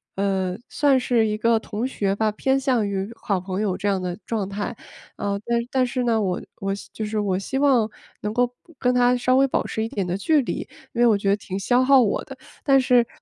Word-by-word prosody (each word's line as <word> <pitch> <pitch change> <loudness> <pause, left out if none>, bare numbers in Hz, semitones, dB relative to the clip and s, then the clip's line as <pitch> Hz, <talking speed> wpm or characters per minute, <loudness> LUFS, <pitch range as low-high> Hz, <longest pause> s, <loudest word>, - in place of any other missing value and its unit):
呃， 190 -2 0
算 280 -3 +3
是 240 -3 +2
一 210 -1 0
个 230 +1 +3
同 220 +2 -3
学 200 -7 -1
吧， 215 +1 +1
偏 265 +5 +1
向 255 -6 +1
于 195 +1 -3
好 200 -4 -1
朋 185 +1 -4
友 200 -4 0
这 205 - -2
样 195 - +1
的 180 -1 -3
状 215 -4 -2
态， 205 +4 -4 0.4
呃， 200 0 -2
但 235 0 +1
但 260 -1 +2
是 250 0 -2
呢， 230 -2 +2
我 185 -3 -1 0.2
我 195 0 -1 0.2
就 220 - -4
是 215 0 -2
我 195 -3 0
希 265 +7 -3
望 265 -6 +3 0.3
能 210 - -2
够 245 +2 +3 0.2
不 335 - -21
跟 250 0 +1
她 245 0 +4
稍 255 +1 +2
微 270 +1 +5
保 - - -1
持 220 - -2
一 225 - -3
点 200 -7 -2
的 180 0 -2
距 300 +9 +3
离， 250 - -4 0.3
因 240 - -1
为 240 - +6
我 215 -3 +4
觉 200 - -3
得 200 - +4
挺 190 -2 -6
消 245 +6 +3
耗 270 +1 +6
我 215 -4 0
的。 270 - -10 0.3
但 275 -2 +5
是 250 -2 +4
220 Hz, 260 characters per minute, -23 LUFS, 200-250 Hz, 0.4 s, 为